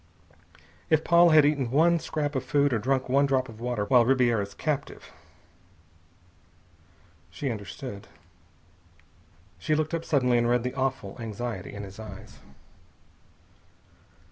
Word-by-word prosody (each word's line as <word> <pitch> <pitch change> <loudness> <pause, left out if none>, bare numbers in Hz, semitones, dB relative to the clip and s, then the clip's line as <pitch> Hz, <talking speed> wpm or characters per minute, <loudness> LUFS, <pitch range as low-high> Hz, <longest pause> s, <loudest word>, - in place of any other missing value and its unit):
If 160 0 +3
Paula 170 0 +5
had 155 -2 +7
eaten 145 -4 +1
one 165 +6 +3
scrap 155 -2 -3
of 130 -2 -2
food 140 +1 +1
or 115 - +1
drunk 130 +3 0
one 140 +2 +3
drop 130 -1 0
of 110 -1 -12
water 120 -4 -2
while 120 +2 +5
Ribiera's 120 -5 +1
captive.... 150 -3 -4 2.2
She 130 - -4
understood. 100 +1 -8 1.5
She 155 - 0
looked 155 +1 -2
up 165 -1 -2
suddenly, 125 -6 +2
and 120 0 +1
read 120 -1 +2
the 125 - -3
awful 130 -7 -3
anxiety 110 -2 -5
in 100 - -6
his 100 +1 -11
eyes. 105 -3 -11
130 Hz, 130 wpm, -26 LUFS, 115-145 Hz, 2.2 s, had